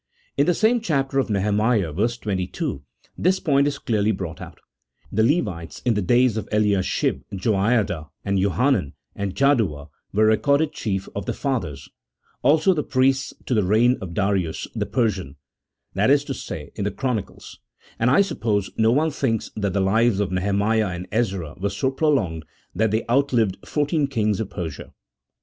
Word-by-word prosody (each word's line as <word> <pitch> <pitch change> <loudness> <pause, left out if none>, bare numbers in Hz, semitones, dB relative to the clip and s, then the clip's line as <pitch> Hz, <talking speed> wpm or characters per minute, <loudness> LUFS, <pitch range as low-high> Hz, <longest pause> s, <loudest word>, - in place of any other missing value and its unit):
In 140 - +2
the 175 - +3
same 225 +4 +3
chapter 135 -8 0
of 130 - 0
Nehemiah, 105 -2 +1
verse 115 +8 0
22, 95 -9 -3 0.4
this 185 +1 +2
point 140 -3 +2
is 145 - -2
clearly 110 -2 0
brought 95 -5 -5
out: - - -10 0.3
" 65 +3 -34
The 110 - +1
Levites 105 - -1
in 120 - +3
the 105 - 0
days 120 +3 +3
of 110 - -4
Ehashib, 105 -3 +1
Joiada, 95 -5 0 0.2
and 100 -1 +1
Johanan, 100 - +1 0.2
and 100 -2 -3
Jaddua, 110 - +1 0.2
were 110 +2 +3
recorded 140 +8 +2
chief 95 -8 -3
of 100 -1 -5
the - - 0
fathers: 85 - -3 0.5
also 160 +5 +4
the 155 - -1
priests, 130 0 +1
to - - -1
the 105 -3 +3
reign 110 +6 +4
of 85 -3 -7
Darius 95 -5 0
the - - -2
Per 115 -4 +2
sian 90 -9 -8 0.2
" - - -63
— - - -54
that - - +2
is - - +4
to - - -4
say, - - -7
in - - -4
the 100 - 0
chronicles; 120 -1 -4 0.4
and, 115 - +3
I 170 - +5
suppose, 105 - -1
no 110 0 +4
one 155 +5 +2
thinks 115 -6 -1
1 110 - -5
that 100 -2 0
the 100 - +1
lives 110 +2 +2
of 100 -3 -1
Neheiniah 100 +1 +1
and 90 +1 -7
Ezra 95 -9 -1
were 100 - +1
so 105 +7 -1
prolonged 130 - 0 0.3
that 110 0 +1
they 110 +2 -1
outlived 120 -6 +2
fourteen 150 0 0
kings 110 -6 0
of 110 -3 -3
Persia. 80 -7 -6
110 Hz, 180 wpm, -23 LUFS, 95-130 Hz, 0.5 s, I